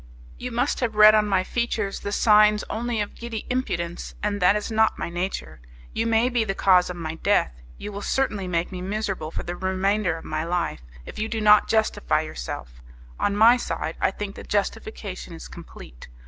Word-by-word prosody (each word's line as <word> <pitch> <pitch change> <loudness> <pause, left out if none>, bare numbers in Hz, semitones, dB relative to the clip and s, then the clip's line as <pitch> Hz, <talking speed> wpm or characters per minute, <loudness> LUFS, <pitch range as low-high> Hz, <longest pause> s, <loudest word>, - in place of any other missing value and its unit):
You 250 - -5
must 245 +4 0
have 230 -4 -1
read 215 0 +8
on 215 -1 +3
my 190 -2 +2
features 220 -2 -2
the 200 - -5
signs 210 0 +5
only 230 0 -2
of 205 - -4
giddy 235 -2 -6
impudence, 175 -9 -3
and 205 -1 -1
that 180 +3 +5
is 210 +1 -3
not 220 0 +2
my - - -4
nature. 175 - -4 0.3
You 225 - -1
may 225 +1 +3
be 245 -2 +1
the 195 -3 -3
cause 185 -2 +4
of 180 - -5
my 160 -2 -5
death, 65 - +1 0.2
you 210 - -7
will 200 0 -6
certainly 210 -6 -1
make 170 0 -1
me 180 -1 -6
miserable 195 -4 -3
for - - -5
the 175 - -5
remainder 190 -1 0
of - - -11
my 155 0 -2
life, 170 - -2 0.2
if - - -9
you 220 +1 -2
do 225 - -2
not 210 0 +6
justify 220 - +1
yourself; - - -7 0.4
on 200 - +1
my 230 +3 +7
side 165 -8 -4
I - - +3
think 200 +1 -6
the - - -9
justification 205 -3 -3
is 165 - -9
complete. 65 - -12
205 Hz, 200 wpm, -24 LUFS, 180-220 Hz, 0.4 s, read